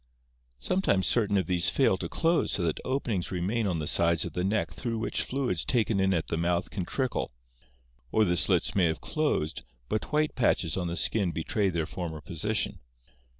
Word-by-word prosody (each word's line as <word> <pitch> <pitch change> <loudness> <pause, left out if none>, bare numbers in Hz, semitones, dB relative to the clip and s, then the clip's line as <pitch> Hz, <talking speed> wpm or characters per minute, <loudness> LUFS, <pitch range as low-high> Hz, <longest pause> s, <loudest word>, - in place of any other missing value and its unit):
Sometimes 100 - +1
certain 105 -4 +2
of 95 - +1
these 90 0 +2
fail 130 -8 +3
to 85 - -4
close 165 0 +1
so 90 - 0
that 80 -2 -1
openings 120 -9 -1
remain 100 +5 -1
on 90 -3 0
the 75 - -3
sides 85 +1 +2
of - - -6
the 90 - -1
neck 105 +3 0
through 115 -3 -3
which 110 - -1
fluids 125 -10 -1
taken 115 -4 +1
in 95 0 +3
at 85 -4 0
the 80 - -1
mouth 85 +1 0
can 95 -4 -3
trickle, 130 +6 -1 0.8
or 110 - +4
the 90 -2 +1
slits - - +3
may 95 -3 +3
have 80 -1 0
closed 145 - -1 0.3
but 110 - -2
white 150 0 +1
patches 95 - +1
on 90 -2 -2
the 85 - -3
skin 100 0 +1
betray 85 +5 0
their 85 -3 -1
former 85 -2 -5
position. 95 +4 -2
95 Hz, 195 wpm, -28 LUFS, 85-115 Hz, 0.8 s, or